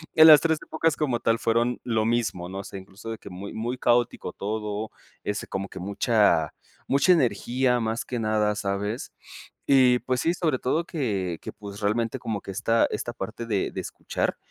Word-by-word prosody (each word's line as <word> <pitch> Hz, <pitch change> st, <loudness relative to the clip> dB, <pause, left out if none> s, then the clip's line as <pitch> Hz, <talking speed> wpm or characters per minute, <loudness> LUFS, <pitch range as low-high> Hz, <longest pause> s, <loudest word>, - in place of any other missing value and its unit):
en 160 Hz, 0 st, +9 dB
las 150 Hz, -2 st, +10 dB
3 160 Hz, -2 st, +1 dB
épocas 160 Hz, -1 st, 0 dB
como 130 Hz, -6 st, 0 dB
tal 115 Hz, 0 st, +2 dB
fueron 120 Hz, +2 st, +1 dB
lo 110 Hz, -2 st, +1 dB
mismo, 110 Hz, -7 st, -1 dB
¿no? 95 Hz, -, -6 dB
O -, -, -5 dB
sea, 100 Hz, -, -7 dB
incluso 100 Hz, +4 st, -9 dB
de 110 Hz, -, -5 dB
que -, -, -11 dB
muy 95 Hz, +2 st, -8 dB
muy 120 Hz, +3 st, -3 dB
caótico 120 Hz, -1 st, +1 dB
todo, 105 Hz, +1 st, -4 dB, 0.3 s
ese 105 Hz, -, -3 dB
como 95 Hz, +1 st, -4 dB
que 95 Hz, -, -9 dB
mucha, 100 Hz, -, +2 dB, 0.3 s
mucha 140 Hz, +7 st, +4 dB
energía 125 Hz, -3 st, +1 dB
más 115 Hz, +2 st, -1 dB
que 125 Hz, -, -3 dB
nada, 110 Hz, -1 st, +1 dB
¿sabes? 105 Hz, +4 st, -3 dB, 0.5 s
Y 125 Hz, -3 st, +5 dB
pues 130 Hz, -1 st, -1 dB
sí, 170 Hz, -, +2 dB
sobre 160 Hz, -7 st, 0 dB
todo 155 Hz, +7 st, 0 dB
que, 100 Hz, -, -2 dB
que -, -, -7 dB
pues 100 Hz, -1 st, -9 dB
realmente 110 Hz, +2 st, 0 dB
como 105 Hz, -3 st, -3 dB
que -, -, -7 dB
esta 115 Hz, +4 st, +2 dB
esta 120 Hz, -, -3 dB
parte 110 Hz, +2 st, -6 dB
de 105 Hz, -4 st, -1 dB
de -, -, -5 dB
escuchar -, -, -3 dB
115 Hz, 190 wpm, -26 LUFS, 100-125 Hz, 0.5 s, las